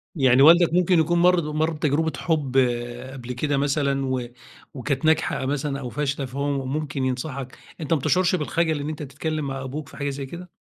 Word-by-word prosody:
يعني 130 Hz, -4 st, +4 dB
والدك 170 Hz, +3 st, +7 dB
ممكن 180 Hz, 0 st, +4 dB
يكون 170 Hz, +2 st, +2 dB
مَر 180 Hz, +1 st, +5 dB
د -, -, -2 dB
مَر 155 Hz, +2 st, 0 dB
بتجربة 155 Hz, +1 st, 0 dB
حُب 150 Hz, -6 st, -1 dB, 0.6 s
قبل 125 Hz, -2 st, -6 dB
كده 145 Hz, +3 st, -1 dB
مثلًا 140 Hz, -1 st, 0 dB
و 130 Hz, -1 st, -1 dB, 0.5 s
وكانت 135 Hz, +1 st, -2 dB
ناجحة 160 Hz, -3 st, +2 dB
مثلًا 140 Hz, 0 st, -2 dB
أو 125 Hz, -3 st, -5 dB
فاشلة، 140 Hz, -1 st, -2 dB
فهو 140 Hz, +1 st, -2 dB
ممكن 140 Hz, -1 st, -2 dB
ينصحك، 130 Hz, 0 st, -4 dB, 0.2 s
أنت 155 Hz, 0 st, 0 dB
ما 160 Hz, -, +2 dB
بتشعُرش 185 Hz, +6 st, +2 dB
بالخَجَل 160 Hz, -1 st, 0 dB
إن 145 Hz, +1 st, -3 dB
أنت 155 Hz, -1 st, -5 dB
تتكلّم 150 Hz, +2 st, -3 dB
مع 135 Hz, 0 st, -4 dB
أبوك 140 Hz, +2 st, -6 dB
في -, -, -13 dB
حاجة 145 Hz, -1 st, -2 dB
زي 140 Hz, 0 st, -5 dB
كده؟ 175 Hz, +6 st, -9 dB
145 Hz, 190 wpm, -24 LUFS, 135-160 Hz, 0.6 s, والدك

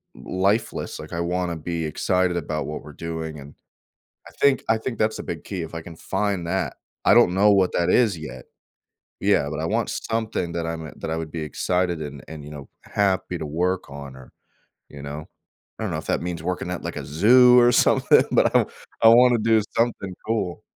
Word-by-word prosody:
lifeless, 100 Hz, +4 st, -1 dB
like, -, -, -9 dB
I 85 Hz, -, -2 dB
wanna 90 Hz, 0 st, -1 dB
be 80 Hz, +1 st, -3 dB
excited 90 Hz, +3 st, 0 dB
about 75 Hz, -1 st, -3 dB
what 75 Hz, -, -5 dB
we're 75 Hz, 0 st, -11 dB
doing, 80 Hz, -1 st, -5 dB
and 70 Hz, +1 st, -12 dB, 0.7 s
I -, -, -11 dB
think 140 Hz, -1 st, +4 dB
I 110 Hz, -, +3 dB
think 115 Hz, 0 st, -5 dB
that's 110 Hz, 0 st, 0 dB
a -, -, -5 dB
big -, -, -6 dB
key 95 Hz, -4 st, -4 dB
if 80 Hz, +1 st, -7 dB
I 80 Hz, -, -5 dB
can 80 Hz, 0 st, -11 dB
find 95 Hz, -2 st, -2 dB
that. -, -, -2 dB, 0.3 s
I -, -, +6 dB
don't 90 Hz, -, +5 dB
know 105 Hz, +2 st, +5 dB
what 95 Hz, -2 st, +3 dB
that 85 Hz, -, +1 dB
is 110 Hz, -8 st, +3 dB
yet. 65 Hz, -5 st, -8 dB, 0.8 s
Yeah, 70 Hz, -, +2 dB
but 75 Hz, 0 st, -4 dB
I 80 Hz, -, -2 dB
want 110 Hz, +5 st, 0 dB
something 110 Hz, -6 st, -2 dB
that 85 Hz, -1 st, -2 dB
I'm 80 Hz, -1 st, -4 dB
e -, -, -10 dB
that -, -, -5 dB
I 80 Hz, -, -1 dB
would 80 Hz, -2 st, -5 dB
be 85 Hz, -, -4 dB
excited 90 Hz, +1 st, -1 dB
and 70 Hz, -3 st, -7 dB
and, 80 Hz, -2 st, -9 dB
you 75 Hz, -, -10 dB
know, 70 Hz, -2 st, -10 dB
happy 95 Hz, -3 st, 0 dB
to 80 Hz, -, -5 dB
work 90 Hz, +5 st, -1 dB
on 70 Hz, -1 st, -9 dB
or 65 Hz, -1 st, -14 dB, 0.6 s
you 70 Hz, -1 st, -10 dB
know, 75 Hz, +2 st, -7 dB, 0.5 s
I -, -, -3 dB
don't -, -, -2 dB
know -, -, -2 dB
if -, -, -8 dB
that -, -, 0 dB
means 85 Hz, -2 st, -4 dB
working 90 Hz, 0 st, -3 dB
at, 90 Hz, -, -5 dB
like, -, -, -5 dB
a -, -, -4 dB
zoo 125 Hz, -, +6 dB
or 120 Hz, 0 st, +5 dB
something, -, -, +4 dB
but -, -, +3 dB
I -, -, +8 dB
want -, -, -2 dB, 0.3 s
I 115 Hz, -, +9 dB
wanna 120 Hz, 0 st, +6 dB
do 110 Hz, 0 st, +3 dB
something 115 Hz, -5 st, 0 dB
cool. 110 Hz, -3 st, -2 dB
85 Hz, 220 wpm, -23 LUFS, 80-105 Hz, 0.8 s, I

